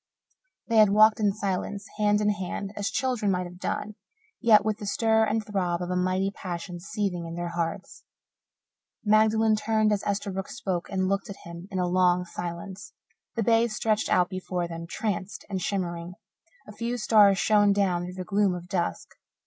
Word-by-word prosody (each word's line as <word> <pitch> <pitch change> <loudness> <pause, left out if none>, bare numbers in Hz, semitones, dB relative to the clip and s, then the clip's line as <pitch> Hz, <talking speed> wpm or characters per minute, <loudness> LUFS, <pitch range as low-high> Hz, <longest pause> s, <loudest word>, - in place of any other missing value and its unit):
They 230 - +1
had 215 -2 +7
walked 215 +2 +5
in 205 -2 +3
silence, 200 0 -3
hand 210 0 +3
in 210 0 +3
hand, 200 0 -4
as 205 0 -2
children 250 -6 0
might 180 -1 0
have 180 0 -11
done, 215 - -3 0.5
yet 215 -3 +5
with 215 0 -1
the 205 - -6
stir 220 +1 +3
and 215 0 -1
throb 180 -4 -1
of 180 0 -4
a - - 0
mighty 185 +2 0
passion 175 -2 -6
seething 180 -2 -3
in 165 - -6
their 175 0 -3
hearts. 170 +3 -4 1.0
Magdalen 220 +1 +4
turned 215 0 +1
as 200 - -1
Esterbrook 195 -1 -3
spoke, 190 -9 -3
and 190 -1 0
looked 195 +1 -1
at 200 - -9
him 170 +2 -9
in 190 - -4
a 180 - +1
long 180 0 +2
silence. 175 +1 -7 0.4
The 230 - 0
bay 230 +1 +4
stretched 215 -1 0
out 180 -1 +3
before 180 -1 -3
them, 165 0 -7
tranced 195 -1 -4
and 190 -1 -2
shimmering; 175 -3 -3 0.5
a - - -9
few 235 +2 -2
stars 210 -4 +5
shone 205 0 +4
down 190 -3 +1
through 180 +1 -8
the 185 - -5
gloom 200 0 +1
of 175 0 -8
dusk. 175 - -2
195 Hz, 180 wpm, -27 LUFS, 180-215 Hz, 1.0 s, had